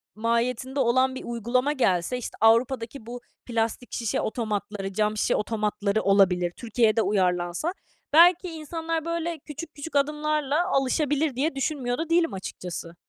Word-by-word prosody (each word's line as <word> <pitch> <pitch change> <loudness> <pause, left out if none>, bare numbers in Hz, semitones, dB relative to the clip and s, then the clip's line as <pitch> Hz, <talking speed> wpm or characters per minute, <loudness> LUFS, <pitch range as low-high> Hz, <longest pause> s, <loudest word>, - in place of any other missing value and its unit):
mahiyetinde 235 +4 -1
olan 260 +1 +3
bir - - -6
uygulama 240 +4 0
gelse, 190 -4 +1
işte, 250 - -7
Avrupa'daki 230 +2 +2
bu 245 +1 -7 0.2
plastik 230 +1 -2
şişe 230 -3 -1
otomatları, 210 -3 -3
cam 210 +1 0
şişe - - +1
otomatları 210 -1 -1
olabilir, 185 -3 +3
Türkiye'de 225 -1 +2
uyarlansa, 180 - 0 0.4
"Belki, 350 +3 +6
insanlar 325 0 -4
böyle 335 -1 -2
küçük, 305 +2 -9
küçük 290 +2 -8
adımlarla 300 +2 +1
alışabilir," 290 -1 +1
diye 275 +3 0
düşünmüyor 270 -3 -1
da 325 0 -3
değilim, 335 0 +2
açıkçası. 180 -3 -6
245 Hz, 135 wpm, -26 LUFS, 215-300 Hz, 0.4 s, Belki